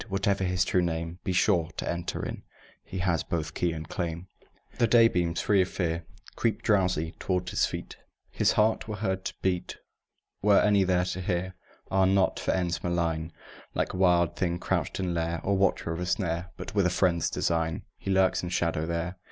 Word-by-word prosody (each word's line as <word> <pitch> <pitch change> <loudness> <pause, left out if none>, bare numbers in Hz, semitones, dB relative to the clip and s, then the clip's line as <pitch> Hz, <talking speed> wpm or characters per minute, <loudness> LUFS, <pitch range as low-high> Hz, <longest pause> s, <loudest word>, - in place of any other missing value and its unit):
Whatever 95 0 +1
his 90 0 +1
true 90 - +2
name, 85 0 -3
Be 95 - -1
sure, 90 -2 +2
to - - -3
enter 85 0 -3
in - - -5 0.4
He 95 - -7
has 90 -3 +1
both 80 -3 -3
key 85 - 0
and 80 -1 -6
claim. 85 +1 -4 0.5
The 120 - +4
daybeams, 90 -8 +4
free 100 -2 +3
of 90 - +1
fear, 85 -2 -2 0.3
Creep 115 -3 0
drowsy 90 -6 +1
toward 90 -1 -1
his - - +2
feet; - - -7 0.3
His - - +2
heart 110 +1 +2
were 110 - -3
heard 95 -2 -2
to - - -4
beat, 90 -2 -1 0.6
Were 100 -1 +5
any 100 -2 +4
there 90 -1 +2
to 90 0 -3
hear; 90 0 -2 0.4
Ah, 95 0 +4
not 95 0 +2
for - - -4
ends 85 -3 0
malign, 85 -2 -1 0.4
Like - - -1
wild 90 -3 +3
thing 85 -2 0
crouched - - -2
in 90 -2 -1
lair, 85 0 -1
Or 100 - +1
watcher 95 -3 +1
of 80 - -3
a 90 - -3
snare, 90 -2 -1
But - - -7
with 100 -3 +3
a - - +2
friend's 85 -2 +2
design 80 -1 -1 0.2
He - - -6
lurks 95 -1 +3
in 90 - -4
shadow 85 -2 0
there! 85 +2 -3
90 Hz, 195 wpm, -28 LUFS, 85-95 Hz, 0.6 s, Were